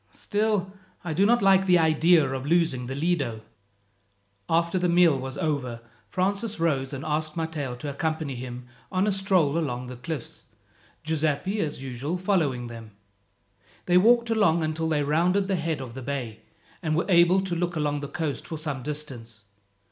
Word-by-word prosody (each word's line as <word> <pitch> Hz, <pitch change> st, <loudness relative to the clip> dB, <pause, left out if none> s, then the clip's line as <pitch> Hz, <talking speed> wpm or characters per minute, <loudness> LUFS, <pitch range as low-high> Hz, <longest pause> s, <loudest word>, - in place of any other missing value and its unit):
"Still, 205 Hz, -3 st, -1 dB, 0.3 s
I 170 Hz, -2 st, -3 dB
do 195 Hz, +6 st, +3 dB
not 240 Hz, -1 st, +3 dB
like 190 Hz, 0 st, +5 dB
the 180 Hz, -1 st, +6 dB
idea 160 Hz, -1 st, +4 dB
of 130 Hz, 0 st, -3 dB
losing 160 Hz, -7 st, +1 dB
the 135 Hz, -, -4 dB
Lido." 140 Hz, -8 st, -1 dB, 1.1 s
After 170 Hz, +2 st, +2 dB
the 180 Hz, 0 st, +1 dB
meal 170 Hz, -5 st, +4 dB
was 130 Hz, 0 st, -6 dB
over 140 Hz, -8 st, -2 dB, 0.3 s
Francis 200 Hz, +3 st, -1 dB
rose, 140 Hz, -5 st, 0 dB
and 140 Hz, +1 st, -6 dB
asked 155 Hz, +1 st, -2 dB
Matteo 155 Hz, -6 st, -3 dB
to 135 Hz, +4 st, -6 dB
accompany 155 Hz, -1 st, -2 dB
him 125 Hz, 0 st, -7 dB, 0.3 s
on 185 Hz, +1 st, +1 dB
a 210 Hz, -, +2 dB
stroll 185 Hz, -6 st, +2 dB
along 125 Hz, -6 st, -3 dB
the 125 Hz, 0 st, -8 dB
cliffs, 140 Hz, +1 st, -7 dB, 0.6 s
Giuseppi 160 Hz, +5 st, 0 dB
as 150 Hz, -6 st, -2 dB
usual 135 Hz, +6 st, -3 dB
following 165 Hz, -10 st, 0 dB
them. 115 Hz, -2 st, -10 dB, 0.9 s
They 180 Hz, 0 st, +5 dB
walked 235 Hz, +3 st, +4 dB
along 185 Hz, -7 st, +3 dB
until 160 Hz, +1 st, -1 dB
they 150 Hz, -2 st, +1 dB
rounded 175 Hz, +7 st, +2 dB
the 195 Hz, -, +1 dB
head 160 Hz, -3 st, -2 dB
of 130 Hz, -3 st, -7 dB
the 130 Hz, -, -7 dB
bay, 125 Hz, -5 st, -4 dB, 0.4 s
and 155 Hz, -3 st, 0 dB
were 170 Hz, -, +1 dB
able 175 Hz, 0 st, +5 dB
to 190 Hz, -2 st, -3 dB
look 175 Hz, 0 st, -1 dB
along 145 Hz, -1 st, 0 dB
the 145 Hz, -, -5 dB
coast 150 Hz, -1 st, -4 dB
for 160 Hz, -, -5 dB
some 145 Hz, -4 st, -3 dB
distance. 125 Hz, -7 st, -6 dB
160 Hz, 170 wpm, -26 LUFS, 135-180 Hz, 1.1 s, the